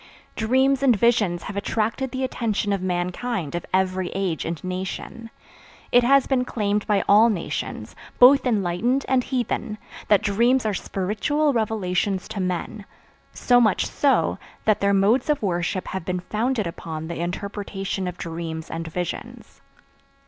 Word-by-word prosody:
Dreams 260 Hz, +4 st, +2 dB
and 260 Hz, -4 st, +5 dB
visions 210 Hz, -5 st, +2 dB
have 200 Hz, -, -6 dB
attracted 225 Hz, +6 st, -1 dB
the 260 Hz, +1 st, -3 dB
attention 220 Hz, -5 st, -1 dB
of 195 Hz, -, -2 dB
mankind 180 Hz, -, -2 dB
of 175 Hz, -, -4 dB
every 185 Hz, -1 st, 0 dB
age 190 Hz, -5 st, -1 dB
and 165 Hz, -1 st, -3 dB
nation. 185 Hz, +5 st, -5 dB, 0.6 s
It 245 Hz, 0 st, +5 dB
has 275 Hz, +2 st, +5 dB
been 260 Hz, -2 st, +1 dB
claimed 210 Hz, -4 st, -1 dB
by 205 Hz, -2 st, +2 dB
all 215 Hz, +3 st, +6 dB
nations, 195 Hz, -7 st, -4 dB, 0.2 s
both 265 Hz, +2 st, +7 dB
enlightened 220 Hz, +4 st, 0 dB
and 260 Hz, -1 st, +2 dB
heathen, 240 Hz, -4 st, -2 dB, 0.3 s
that 210 Hz, 0 st, +4 dB
dreams 235 Hz, +5 st, +2 dB
are 215 Hz, -, +1 dB
spiritual 220 Hz, +12 st, 0 dB
revelations 200 Hz, -4 st, -1 dB
to 200 Hz, -, -5 dB
men; 185 Hz, +3 st, -3 dB, 0.5 s
so 245 Hz, -1 st, +3 dB
much 215 Hz, -4 st, +2 dB
so, 280 Hz, -2 st, +1 dB, 0.3 s
that 215 Hz, -2 st, +3 dB
their 200 Hz, 0 st, +2 dB
modes 220 Hz, +9 st, +2 dB
of 295 Hz, -6 st, +1 dB
worship 175 Hz, -1 st, -1 dB
have 190 Hz, -2 st, -4 dB
been 180 Hz, +1 st, -3 dB
founded 220 Hz, +3 st, -1 dB
upon 160 Hz, -2 st, -6 dB
the 170 Hz, -, -5 dB
interpretation 195 Hz, +1 st, -4 dB
of 180 Hz, 0 st, -5 dB
dreams 165 Hz, -1 st, -5 dB
and 165 Hz, 0 st, -4 dB
visions. 175 Hz, +1 st, -6 dB
205 Hz, 150 wpm, -23 LUFS, 180-240 Hz, 0.6 s, both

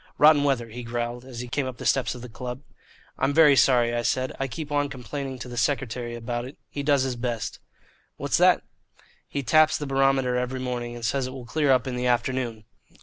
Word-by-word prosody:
"Rotten 150 Hz, -1 st, +6 dB
weather," 130 Hz, -5 st, 0 dB
he 120 Hz, +3 st, -7 dB
growled, 120 Hz, +1 st, -4 dB
as 125 Hz, -2 st, -7 dB
he 125 Hz, -, -6 dB
came 130 Hz, +2 st, -1 dB
up 130 Hz, -2 st, -6 dB
the -, -, -8 dB
steps 125 Hz, -4 st, +2 dB
of 125 Hz, -, -9 dB
the -, -, -6 dB
club. 125 Hz, +3 st, -7 dB, 0.6 s
"I'm 140 Hz, -, +1 dB
very 155 Hz, -3 st, +7 dB
sorry," 120 Hz, -2 st, +4 dB
I 120 Hz, -, 0 dB
said. 130 Hz, +2 st, -1 dB
"I 135 Hz, -, 0 dB
keep 150 Hz, +3 st, -6 dB
on 145 Hz, -1 st, +1 dB
complaining 135 Hz, 0 st, -5 dB
to 125 Hz, -, -7 dB
the 120 Hz, -1 st, -8 dB
secretary 120 Hz, -1 st, -1 dB
about 120 Hz, +1 st, -3 dB
it. 130 Hz, -, -10 dB
He 145 Hz, -, -3 dB
does 140 Hz, -2 st, +3 dB
his 130 Hz, -2 st, -2 dB
best." 120 Hz, -2 st, -3 dB, 0.6 s
"What's -, -, 0 dB
that?" -, -, +5 dB, 0.6 s
"He 140 Hz, -, -3 dB
taps 155 Hz, +6 st, +4 dB
the 145 Hz, -, -4 dB
barometer 135 Hz, -2 st, +2 dB
every 125 Hz, +1 st, -2 dB
morning, 120 Hz, -2 st, -3 dB
and 120 Hz, -1 st, -5 dB
says 130 Hz, +2 st, 0 dB
it 130 Hz, -, -7 dB
will 130 Hz, -2 st, -8 dB
clear 145 Hz, +3 st, +1 dB
up 130 Hz, -3 st, +3 dB
in 130 Hz, -2 st, -3 dB
the 125 Hz, 0 st, -1 dB
afternoon. 120 Hz, -2 st, 0 dB
125 Hz, 220 wpm, -25 LUFS, 120-135 Hz, 0.6 s, very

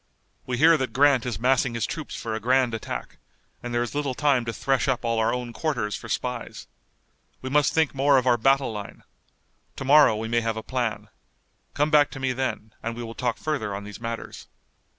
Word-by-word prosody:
We 125 Hz, -1 st, -2 dB
hear 160 Hz, +3 st, +6 dB
that 130 Hz, -3 st, -3 dB
Grant 135 Hz, -3 st, +4 dB
is 115 Hz, -5 st, -3 dB
massing 125 Hz, 0 st, +2 dB
his 115 Hz, -2 st, 0 dB
troops 155 Hz, -2 st, -6 dB
for 115 Hz, -, -4 dB
a 110 Hz, -, -2 dB
grand 125 Hz, +1 st, +2 dB
attack, 110 Hz, -, -6 dB, 0.4 s
and 120 Hz, -, -6 dB
there 120 Hz, 0 st, +1 dB
is 120 Hz, -, -6 dB
little 145 Hz, -3 st, -2 dB
time 140 Hz, -5 st, +2 dB
to 115 Hz, -, -2 dB
thresh 135 Hz, +3 st, 0 dB
up 125 Hz, -2 st, 0 dB
all 115 Hz, -1 st, +1 dB
our 110 Hz, -, +2 dB
own 125 Hz, -1 st, -4 dB
quarters 115 Hz, -8 st, -2 dB
for -, -, -9 dB
spies. -, -, -4 dB, 0.8 s
We 130 Hz, -, -4 dB
must 145 Hz, 0 st, +3 dB
think 160 Hz, -2 st, +1 dB
more 140 Hz, 0 st, +4 dB
of 130 Hz, -, +1 dB
our 125 Hz, -2 st, +4 dB
battle 135 Hz, 0 st, +2 dB
line. 105 Hz, -1 st, -8 dB, 0.7 s
To 135 Hz, -, -6 dB
morrow 140 Hz, -5 st, +6 dB
we 110 Hz, +1 st, -4 dB
may 120 Hz, +1 st, +1 dB
have 115 Hz, -1 st, -2 dB
a 110 Hz, -, -5 dB
plan. 120 Hz, -5 st, -3 dB, 0.7 s
Come 150 Hz, +1 st, +1 dB
back 150 Hz, -2 st, +5 dB
to 135 Hz, -, -9 dB
me 130 Hz, -1 st, 0 dB
then, 125 Hz, -4 st, -3 dB
and 115 Hz, 0 st, -4 dB
we 120 Hz, -, -6 dB
will 115 Hz, 0 st, -7 dB
talk 120 Hz, -1 st, -2 dB
further 130 Hz, -10 st, -2 dB
on 100 Hz, -, -6 dB
these 105 Hz, +2 st, -10 dB
matters." 115 Hz, 0 st, -6 dB
125 Hz, 215 wpm, -25 LUFS, 115-135 Hz, 0.8 s, hear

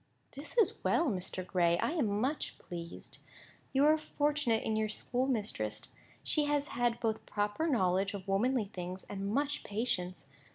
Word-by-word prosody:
"This 290 Hz, -, -10 dB
is 450 Hz, -, +3 dB
well, 335 Hz, -3 st, +3 dB
Mr. 185 Hz, -1 st, -3 dB
Gray. 170 Hz, -2 st, +3 dB
I -, -, +1 dB
am 225 Hz, -12 st, +1 dB
much 270 Hz, +6 st, -1 dB
pleased. 170 Hz, -1 st, -8 dB, 0.5 s
You 275 Hz, +2 st, +4 dB
are 310 Hz, +1 st, +5 dB
fortunate 290 Hz, -7 st, +1 dB
in 220 Hz, -, 0 dB
your 215 Hz, 0 st, +1 dB
schoolmistress. 220 Hz, -, -1 dB, 0.3 s
She 300 Hz, -1 st, +2 dB
has 290 Hz, 0 st, 0 dB
had 240 Hz, -1 st, +1 dB
both 220 Hz, -2 st, -1 dB
proper 210 Hz, +10 st, 0 dB
knowledge 195 Hz, -, +2 dB
of 195 Hz, -1 st, -7 dB
womanly 225 Hz, +4 st, +2 dB
things 180 Hz, +1 st, -5 dB
and 200 Hz, 0 st, -3 dB
much 285 Hz, +4 st, 0 dB
patience. 190 Hz, -, -2 dB
220 Hz, 155 wpm, -33 LUFS, 190-280 Hz, 0.5 s, are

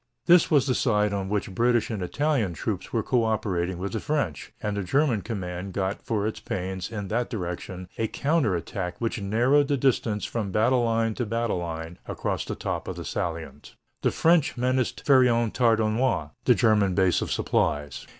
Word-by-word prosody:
This 175 Hz, -1 st, +6 dB
was 145 Hz, -4 st, +4 dB
the 130 Hz, -, +1 dB
side 105 Hz, -5 st, +1 dB
on 95 Hz, -1 st, -2 dB
which 100 Hz, -2 st, -2 dB
British 120 Hz, +2 st, +2 dB
and 105 Hz, -3 st, -3 dB
Italian 115 Hz, -, 0 dB
troops -, -, -4 dB
were -, -, 0 dB
co 125 Hz, -2 st, +2 dB
operating 95 Hz, -5 st, -1 dB
with 100 Hz, +4 st, -4 dB
the 110 Hz, -, -1 dB
French, 125 Hz, -, -2 dB
and 105 Hz, -1 st, -2 dB
the 100 Hz, -, -1 dB
German 130 Hz, -, +1 dB
command 95 Hz, -3 st, -5 dB
got 95 Hz, 0 st, -2 dB
for 105 Hz, -3 st, -1 dB
its 110 Hz, -, -3 dB
pains 95 Hz, +1 st, -4 dB
in 105 Hz, -3 st, -4 dB
that 120 Hz, +2 st, -1 dB
direction 90 Hz, -3 st, -5 dB
a 115 Hz, -, +1 dB
counter 140 Hz, -, +1 dB
attack 90 Hz, +1 st, -4 dB
which 115 Hz, -1 st, -2 dB
narrowed 125 Hz, +8 st, +3 dB
the 140 Hz, -1 st, +1 dB
distance 120 Hz, -5 st, +1 dB
from 105 Hz, -4 st, -3 dB
battle 120 Hz, +5 st, +3 dB
line 115 Hz, -1 st, +1 dB
to 120 Hz, -, -2 dB
battle 115 Hz, -3 st, -1 dB
line 80 Hz, 0 st, -6 dB
across -, -, -2 dB
the -, -, -4 dB
top -, -, -4 dB
of -, -, -4 dB
the -, -, -7 dB
salient. 85 Hz, -1 st, -5 dB, 0.3 s
The -, -, +3 dB
French 165 Hz, -5 st, +2 dB
menaced 125 Hz, 0 st, 0 dB
Fère 130 Hz, -3 st, +6 dB
en 115 Hz, -2 st, +1 dB
Tardenois, 115 Hz, -, +1 dB
the -, -, +6 dB
German 105 Hz, -4 st, +3 dB
base 95 Hz, -2 st, +3 dB
of -, -, -3 dB
supplies. 75 Hz, -1 st, -1 dB
110 Hz, 190 wpm, -26 LUFS, 95-120 Hz, 0.3 s, This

